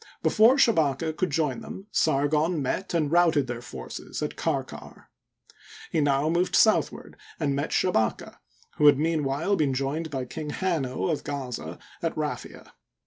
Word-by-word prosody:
Before 225 +5 +5
Shabaka 160 - +2
could 180 +4 -1
join 145 -4 -1
them, 195 - -9
Sargon 155 +3 +1
met 170 +7 -2
and 155 -3 +1
routed 165 -5 +4
their 120 -1 -5
forces 120 - -7
at - - -3
Karkar, - - -5 0.8
He 160 - +1
now 140 0 +2
moved 170 +3 +1
southward, 220 - +2 0.2
and 145 -3 0
met 140 +3 -2
Shabaka, 110 -12 0 0.4
who 150 - +5
had 145 - +7
meanwhile 155 +3 0
been 145 -7 +1
joined 145 +5 -2
by 135 -3 -3
King 150 +4 -6
Hanno, 155 -6 -1
of 150 - -2
Gaza, 125 - -5 0.2
at 165 -1 -2
Raphia. 150 -1 -5
150 Hz, 145 wpm, -26 LUFS, 135-165 Hz, 0.8 s, had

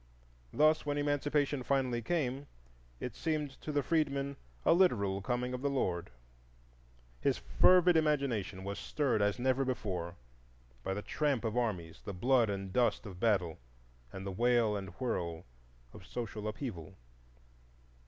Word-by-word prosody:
Thus, 155 +2 +4
when 145 -1 -1
Emancipation 145 -1 +1
finally 130 -2 0
came, 140 -1 -1 0.5
it 125 - -4
seemed 155 -3 -1
to 155 - -4
the 145 -1 +1
freedman 140 -2 0 0.3
a - - +6
literal 100 - +3
Coming 125 +3 -1
of 125 - -4
the 140 - +1
Lord. 90 -10 -1 1.1
His - - +1
fervid 175 - +5
imagination 135 -12 +1
was 100 +1 -4
stirred 135 -8 0
as 100 0 +2
never 130 +2 +2
before, 95 -9 -3 0.7
by 95 - -2
the 105 - -4
tramp 145 -6 0
of 110 0 -1
armies, 95 -10 -2
the 100 - -5
blood 120 +4 +3
and 95 -2 -4
dust 120 -2 +2
of 95 -4 -8
battle, 95 -7 +1 0.5
and 95 0 -7
the 100 - -3
wail 115 +1 +3
and 95 -1 -4
whirl 85 -10 -2 0.5
of - - -12
social 110 -3 -4
upheaval. 105 - -5
120 Hz, 145 wpm, -33 LUFS, 100-140 Hz, 1.1 s, a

